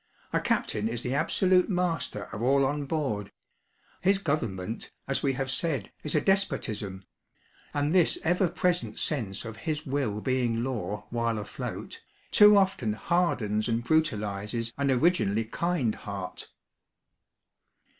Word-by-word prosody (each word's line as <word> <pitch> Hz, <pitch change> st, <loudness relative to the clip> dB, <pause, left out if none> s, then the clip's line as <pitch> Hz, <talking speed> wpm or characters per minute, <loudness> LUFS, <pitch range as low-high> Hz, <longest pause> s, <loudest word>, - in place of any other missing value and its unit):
A -, -, +3 dB
captain 105 Hz, +1 st, 0 dB
is 120 Hz, +1 st, -3 dB
the 125 Hz, -, -1 dB
absolute 180 Hz, +6 st, +3 dB
master 175 Hz, -, -1 dB
of 110 Hz, -, -5 dB
all 135 Hz, +3 st, +4 dB
on 145 Hz, +1 st, -1 dB
board 135 Hz, -10 st, -2 dB, 0.7 s
his 195 Hz, +2 st, +4 dB
government, 115 Hz, -, -3 dB, 0.2 s
as 135 Hz, -, +1 dB
we 135 Hz, -2 st, +1 dB
have 130 Hz, 0 st, -2 dB
said, 140 Hz, -, -1 dB
is 150 Hz, -, +1 dB
a -, -, +4 dB
despotism; 105 Hz, -, 0 dB, 0.7 s
and 145 Hz, +2 st, 0 dB
this 180 Hz, -3 st, +4 dB
ever 180 Hz, +3 st, +3 dB
present 175 Hz, +1 st, -1 dB
sense 115 Hz, -9 st, -2 dB
of 115 Hz, 0 st, -7 dB
his 155 Hz, -1 st, -3 dB
will 130 Hz, -7 st, -1 dB
being 120 Hz, -1 st, 0 dB
law 105 Hz, -5 st, -3 dB
while 115 Hz, -1 st, 0 dB
afloat, 105 Hz, -, -6 dB, 0.3 s
too 210 Hz, 0 st, +8 dB
often 190 Hz, -, +2 dB
hardens 110 Hz, -, 0 dB
and 115 Hz, +1 st, 0 dB
brutalises 115 Hz, -6 st, 0 dB
an 140 Hz, 0 st, 0 dB
originally 125 Hz, -, +2 dB
kind 140 Hz, -2 st, 0 dB
heart. 95 Hz, -2 st, -7 dB
130 Hz, 135 wpm, -28 LUFS, 110-165 Hz, 0.7 s, too